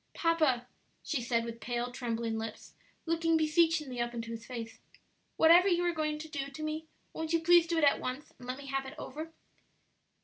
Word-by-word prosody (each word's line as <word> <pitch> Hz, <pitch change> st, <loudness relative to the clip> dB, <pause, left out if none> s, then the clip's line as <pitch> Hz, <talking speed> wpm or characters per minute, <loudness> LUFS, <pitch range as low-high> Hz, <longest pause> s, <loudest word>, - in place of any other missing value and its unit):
"Papa," 310 Hz, -8 st, +2 dB, 0.4 s
she 290 Hz, -6 st, -1 dB
said, 230 Hz, -1 st, 0 dB
with 230 Hz, 0 st, -6 dB
pale, 240 Hz, +2 st, -2 dB
trembling 230 Hz, -2 st, -2 dB
lips, 220 Hz, -1 st, -7 dB, 0.3 s
looking 330 Hz, 0 st, +2 dB
beseechingly 310 Hz, -5 st, +2 dB
up 240 Hz, 0 st, -2 dB
into 230 Hz, 0 st, -5 dB
his 230 Hz, 0 st, -7 dB
face, 230 Hz, -3 st, -6 dB, 0.6 s
"whatever 340 Hz, +4 st, +7 dB
you 350 Hz, -2 st, +3 dB
are 345 Hz, -, +2 dB
going 305 Hz, -1 st, -1 dB
to 310 Hz, +1 st, -7 dB
do 280 Hz, -3 st, -4 dB
to 280 Hz, +2 st, -8 dB
me, 310 Hz, +1 st, -3 dB, 0.3 s
won't 320 Hz, 0 st, -3 dB
you 330 Hz, -, +4 dB
please 340 Hz, +1 st, +5 dB
do 335 Hz, 0 st, 0 dB
it 325 Hz, -, +2 dB
at 285 Hz, -, +5 dB
once 255 Hz, +4 st, -5 dB
and 245 Hz, -, -11 dB
let 255 Hz, +1 st, -3 dB
me 280 Hz, -, -10 dB
have 270 Hz, 0 st, -2 dB
it -, -, -9 dB
over?" 315 Hz, +4 st, -6 dB
285 Hz, 200 wpm, -31 LUFS, 240-325 Hz, 0.6 s, whatever